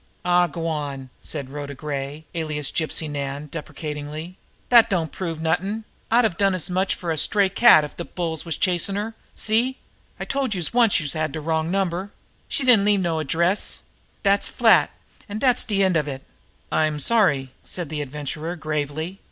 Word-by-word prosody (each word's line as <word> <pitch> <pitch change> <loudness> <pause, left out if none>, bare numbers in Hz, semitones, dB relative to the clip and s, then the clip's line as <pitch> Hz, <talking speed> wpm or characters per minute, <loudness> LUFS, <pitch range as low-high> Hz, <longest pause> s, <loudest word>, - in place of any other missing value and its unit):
"Aw, 175 0 +4
go 165 +1 -5
on!" 140 -5 -3
said 140 -4 -5
Rhoda 145 -1 -6
Gray, 145 +2 -5
alias 155 -3 -2
Gypsy 160 -1 -1
Nan, 145 0 -4
deprecatingly. 150 +3 -6 0.4
"Dat 235 -2 +8
don't 170 -6 0
prove 165 -4 -4
nothin'! 185 +7 -1 0.3
I'd 240 +2 +5
have 210 -7 0
done 195 -2 +3
as 180 0 -2
much 185 +2 +1
for 170 -2 -3
a 160 - -1
stray 200 +5 +4
cat 195 -5 +7
if 150 - -7
de 170 - -4
bulls 165 -3 -3
was 165 -2 -3
chasm' 185 +1 +1
her. 210 +3 -3 0.2
See? 235 +4 +1 0.4
I - - -3
told 270 -6 -1
youse 175 0 -1
once 235 -5 +4
youse 145 -4 -2
had 155 -2 -1
de 160 - -3
wrong 160 +1 -1
number. 190 +1 -1 0.4
She - - 0
didn't 245 -6 +6
leave 205 -2 +3
no 165 -3 0
address. 170 +6 0 0.4
Dat's 200 0 +3
flat, - - +5 0.4
an' 205 - -4
dat's 250 +1 +3
de 200 -2 +1
end 190 -2 +3
of 150 -2 +1
it." 135 -2 -5 0.5
"I'm 155 -1 +1
sorry," 145 - +2
said 175 -5 -5
the 155 -1 -3
Adventurer 150 +4 -5
gravely. 155 +3 -3
165 Hz, 180 wpm, -23 LUFS, 150-195 Hz, 0.5 s, Dat